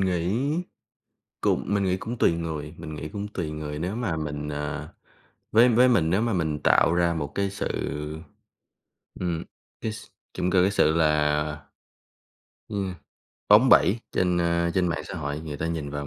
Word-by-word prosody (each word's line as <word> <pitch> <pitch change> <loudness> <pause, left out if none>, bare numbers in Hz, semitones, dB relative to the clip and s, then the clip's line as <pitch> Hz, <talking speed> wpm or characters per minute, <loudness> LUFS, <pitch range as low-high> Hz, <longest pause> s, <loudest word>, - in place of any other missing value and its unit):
nghĩ 90 +1 0 1.0
cũng - - +1
mình 100 -1 +1
nghĩ 95 0 +1
cũng 115 +5 -6
tùy 85 - +4
người 80 -2 -4
mình 80 -2 -7
nghĩ 75 +1 -6
cũng 105 0 -5
tùy 85 -7 -4
người 75 -1 -5
nếu 90 +7 -3
mà 95 -10 -1
mình, 75 -1 -4
à 75 0 -4 0.6
với 115 +3 +7
với 125 +2 +5
mình 85 -10 +3
nếu 100 +5 +2
mà 115 - 0
mình 80 -5 0
tạo 85 - +5
ra 85 -1 +2
một 75 -3 -4
cái 100 -1 0
sự, 100 - -3 1.5
ừm, 85 -2 -2 0.4
cái 110 - -2
s 110 - -10 0.3
trông 90 - 0
cơ 90 -1 +4
cái 95 - +3
sự 80 -6 +3
là 75 -2 +3 1.3
yeah, 95 -3 -3 0.5
bóng 110 +6 +7
bẩy 110 +4 +5
trên, 90 -1 +1
ờ, 85 0 +1
trên 90 -2 +2
mạng 85 - -2
xã - - -7
hội, 75 -2 -3
người 80 -2 -6
ta 80 - -2
nhìn 80 -4 -3
vào 70 0 -4
85 Hz, 180 wpm, -26 LUFS, 75-100 Hz, 1.5 s, với